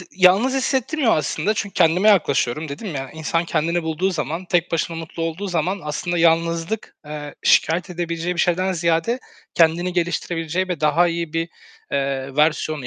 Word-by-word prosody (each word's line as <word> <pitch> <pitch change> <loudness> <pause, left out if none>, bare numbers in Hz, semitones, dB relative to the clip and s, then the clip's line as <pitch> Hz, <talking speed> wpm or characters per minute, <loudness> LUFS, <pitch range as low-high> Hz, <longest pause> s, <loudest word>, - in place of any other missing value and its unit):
d 180 - -10
yalnız 190 +8 +4
hissettirmiyor 265 - +1
aslında 155 +7 0
çünkü 205 -1 -3
kendime 180 +4 +4
yaklaşıyorum. 155 - +2
Dedim 155 +5 -6
ya, 135 -1 -5
insan 160 +2 -1
kendini 170 +1 0
bulduğu 160 +4 -1
zaman, 165 +1 -3
tek 175 -1 0
başına 165 0 -1
mutlu 165 0 -6
olduğu 165 +5 -3
zaman 180 +2 -1
aslında 160 +4 -2
yalnızlık, 165 +4 +1
eee, 150 -1 -7
şikâyet 170 +4 +3
edebileceği 170 0 -3
bir 175 - 0
şeyden 185 +2 +1
ziyade 170 +7 0 0.4
kendini 170 +2 +3
geliştirebileceği 175 0 -1
ve 180 -4 -3
daha 160 +3 +3
iyi 170 -2 -3
bir, 165 +1 -1 0.4
eee, 135 -1 -2
versiyonu 150 -2 +1
170 Hz, 160 wpm, -21 LUFS, 155-180 Hz, 0.4 s, yalnız